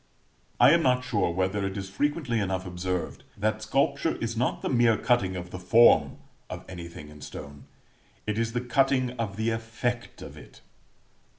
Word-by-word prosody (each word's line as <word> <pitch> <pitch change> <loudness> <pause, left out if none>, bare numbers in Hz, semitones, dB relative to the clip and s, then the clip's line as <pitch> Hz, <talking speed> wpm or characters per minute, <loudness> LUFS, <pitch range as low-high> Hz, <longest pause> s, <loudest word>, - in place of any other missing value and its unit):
I - - +8
am 170 +1 +5
not 125 -3 +2
sure 125 -8 0
whether 95 +3 -1
it 95 0 -3
is 95 -1 -4
frequently 140 +1 0
enough 95 -2 -2
observed 90 0 -4
that 110 +1 -1
sculpture 140 +7 +1
is 115 0 -3
not 125 +3 -1
the - - -1
mere 120 -3 +4
cutting 100 -7 +1
of 90 -1 -6
the 90 - -6
form 90 -7 +5 0.3
of - - -7
anything 85 -4 -9
in 75 -1 -14
stone; 70 0 -9 0.6
it 105 +1 -1
is 115 0 -1
the 120 - -1
cutting 130 0 +2
of 105 -4 -2
the 110 +1 0
effect 115 +2 -3
of - - -10
it. - - -15
110 Hz, 175 wpm, -27 LUFS, 95-120 Hz, 0.6 s, I